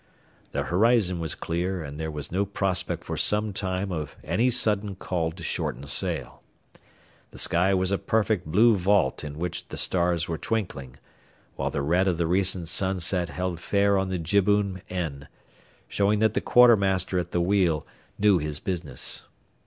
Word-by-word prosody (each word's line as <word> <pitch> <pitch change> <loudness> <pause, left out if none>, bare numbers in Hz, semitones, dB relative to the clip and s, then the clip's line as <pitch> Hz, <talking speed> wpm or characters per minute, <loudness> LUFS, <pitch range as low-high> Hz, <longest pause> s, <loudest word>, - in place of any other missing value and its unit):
The - - -2
horizon 100 -2 +2
was 80 -3 -3
clear, 90 +1 -3
and 70 0 -8
there 80 0 -3
was 75 -2 -6
no 95 +3 +1
prospect 95 -2 -1
for - - -5
some 105 0 +2
time 95 0 -2
of 75 -4 -5
any 90 - +1
sudden 105 -5 +2
call 85 -3 -2
to 85 0 -11
shorten - - -2
sail. - - -1 0.9
The - - -14
sky 90 +3 +3
was 95 0 0
a 100 - 0
perfect 110 -5 0
blue 110 +8 +4
vault 95 -7 +1
in 75 -1 -7
which 85 +1 -4
the - - -8
stars 85 -2 +1
were 80 -2 -4
twinkling, 85 - -4 0.6
while - - -2
the 70 - -3
red 90 +6 +2
of 90 -3 +1
the 85 - 0
recent 90 0 +1
sunset 90 -1 +1
held 90 -2 -3
fair 100 +2 +2
on 95 -1 0
the 95 - -2
jibboom 100 +2 +1
end, 80 -7 -4 0.6
showing 100 +1 +1
that 110 0 +2
the - - 0
quartermaster 100 -7 +4
at 90 -1 -4
the 90 - -1
wheel 85 -4 +1 0.3
knew 100 -3 +4
his 75 -1 -3
business. 90 -10 -3
90 Hz, 170 wpm, -25 LUFS, 85-100 Hz, 0.9 s, blue